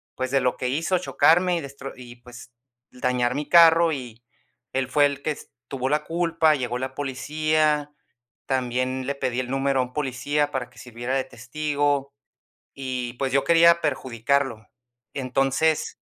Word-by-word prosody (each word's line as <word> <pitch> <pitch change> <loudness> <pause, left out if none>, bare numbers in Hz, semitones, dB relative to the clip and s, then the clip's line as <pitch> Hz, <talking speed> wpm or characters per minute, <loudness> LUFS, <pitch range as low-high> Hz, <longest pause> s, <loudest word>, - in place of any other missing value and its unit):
pues, 130 0 -3
de 135 -1 +2
lo 125 0 0
que 125 - -2
hizo, 160 +7 0
chocarme 180 0 +3
y - - -3
destro 140 -1 -8
y, 120 -1 -12
pues 120 0 -13 0.4
dañar 125 -1 0
mi 145 +1 -3
carro, 170 -1 +6
y 120 -4 -8 0.5
él 130 0 -1
fue 145 +2 +4
el 140 -1 -2
que 155 - -1
es 150 - -9 0.2
tuvo 130 -1 -2
la 150 +1 +1
culpa. 165 -1 +2
Llegó 125 -2 -3
la 130 +1 -5
policía, 150 +2 0 0.5
también 130 0 -1
le 140 - -1
pedí 130 -2 -2
el 125 -1 -3
número 135 0 0
a - - +1
un 125 0 -10
policía 145 +1 -1
para 130 -4 -3
que 120 0 -18
sirviera 120 +2 -4
de 135 - +1
testigo 145 +2 -2 0.6
y, 130 -3 -4
pues 130 +1 -2
yo 140 0 +2
quería 170 0 +5
perjudicarlo. 130 -4 -1 0.5
Entonces 135 +4 0
135 Hz, 165 wpm, -24 LUFS, 125-150 Hz, 0.6 s, carro